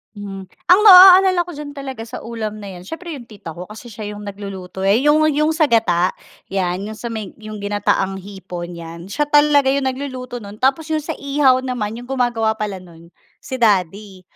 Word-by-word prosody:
Mhm, 195 -2 -8 0.2
ang 360 +3 +7
ma-aaalala 370 -1 +9
ko 345 -3 -7
diyan 295 -1 -7
talaga 265 -5 -7
sa 230 - -8
ulam 220 -2 -6
na 200 - -8
'yan 180 -1 -10
siyempre 335 - -8
'yong 240 - -12
tita 205 -7 -11
ko, 175 +3 -8
kasi 215 +4 -11
siya 210 -1 -7
'yong 205 - -9
nagluluto 195 -2 -7
eh, 200 +5 +3
'Yong 300 +2 +4
'yong 305 +2 +2
sa 315 - +4
gata, 190 -8 +2 0.4
'yan, 185 0 -1
'yong 215 - -6
sa 235 +2 -7
may 215 -4 -6
'yong 215 0 -8
ginataang 205 -1 -1
hipon 180 -3 -8
'yan, 170 +2 -9
siya 295 +9 -1
talaga 290 -2 +4
'yong 275 -1 0
nagluluto 255 -2 -6
no'n, 205 -1 -11
tapos 270 +5 +2
'yong 310 - 0
sa 310 +1 -5
ihaw 275 -2 +2
naman 230 -4 -3
'yong 245 - -9
gumagawa 240 -4 0
pala 210 -3 -4
no'n, 170 -2 -15 0.3
si 260 - -6
daddy. 200 -3 0
220 Hz, 195 wpm, -19 LUFS, 195-275 Hz, 0.4 s, ma-aaalala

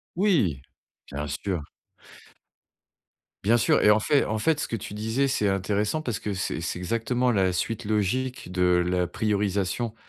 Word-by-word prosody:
Oui! 155 - +2 0.5
bien 75 +1 -4
sûr 90 +4 -3 1.8
bien 115 +4 +4
sûr, 115 - +3
et - - +5
en 105 - +6
fait 140 +6 +2
en 110 - -1
fait, 150 +7 +1
ce - - -2
que - - -3
tu 105 -1 -7
disais 110 +6 0
c'est 130 -6 +1
intéressant 105 +9 0
parce 120 -7 -2
que 105 -2 -3
c'est 90 -3 -3
c'est 85 - -3
exactement 115 +6 0
la 95 -4 +2
suite 115 +5 -2
logique 110 +3 -1
de 90 -1 +3
la 90 -1 +1
priorisation 105 +2 -1
105 Hz, 160 wpm, -26 LUFS, 90-120 Hz, 1.8 s, en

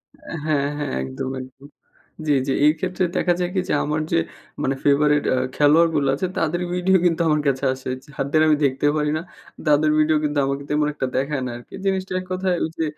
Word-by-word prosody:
অ্যা - - -9
হ্যাঁ, 145 -2 +1
হ্যাঁ। 145 -2 -3
একদম, 65 - -5
একদম। 130 +2 -13 0.6
জ্বি, 150 - +3
জ্বি। 135 - +1
এই 150 - +7
ক্ষেত্রে 185 0 -1
দেখা 175 - +2
যায় 175 0 0
কি? - - +2
যে, - - +1
আমার 150 +1 -1
যে - - +3 0.5
মানে 135 0 0
ফেভারিট 145 +1 +4
এ্যা 130 - +2 0.2
খেলোয়াড় 155 +3 +5
গুলো 140 -2 +2
আছে। 185 - -2
তাদের 175 +2 0
ভিডিও 185 +1 +2
কিন্তু 170 -1 +2
আমার 150 -1 +2
কাছে 135 0 0
আসে। 130 0 -7 0.2
যাদের 145 +1 0
আমি 155 - +5
দেখতে 135 +2 +1
পারি 150 0 0
না। - - -3 0.5
তাদের 150 +1 +4
ভিডিও 155 0 +3
কিন্তু 145 -1 0
আমাকে 140 +1 -2
তেমন 150 0 +1
একটা 130 -3 -2
দেখায় 140 0 -1
না - - -4
আরকি। 120 - -15
জিনিসটা 190 -1 -1
এক - - -11
কথায় 185 -1 0
ওই 160 - -1
যে, - - +2
150 Hz, 215 wpm, -22 LUFS, 140-165 Hz, 0.6 s, এই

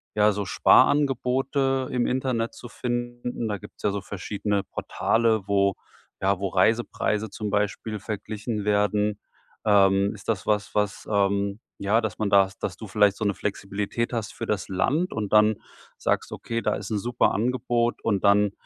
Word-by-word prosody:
ja, 105 0 +5
so 100 0 -3
Sparangebote 135 +1 +3
im 125 -1 +1
Internet 125 -3 -1
zu 120 - -10
finden? 120 -1 -3
Da 105 -1 -2
gibt's 105 - -14
ja - - +3
so 100 0 -3
verschiedene 100 +1 -2
Portale, 110 +1 0
wo 100 -1 +3 0.5
ja, 95 0 +1
wo 95 -1 -1
Reisepreise 110 +1 +1
zum 105 -2 -4
Beispiel 105 +1 -1
verglichen 105 +1 -4
werden. 105 0 +1 0.5
Ähm, 100 -1 +4
ist 100 - -14
das 105 -3 -1
was, 105 -1 0
was, 105 -1 -1
ähm 100 0 +1 0.2
ja, 105 +4 +2
dass 110 -2 -4
man 105 -2 0
da 100 -1 +5
dass 90 -2 -3
du 110 - -8
vielleicht 100 0 +3
so 110 - -2
'ne 100 - +2
Flexibilität 105 +4 -3
hast 115 -3 -3
für - - -5
das 105 -3 -1
Land 145 - 0
und 105 -2 -3
dann 105 0 +5 0.4
sagst: - - -1
„Okay, 115 0 -3
da - - 0
ist 100 +2 -7
'n 105 - 0
super 120 +3 +1
Angebot. 120 +1 0
Und 100 -4 0
dann, 100 0 +4
105 Hz, 165 wpm, -25 LUFS, 100-115 Hz, 0.5 s, ja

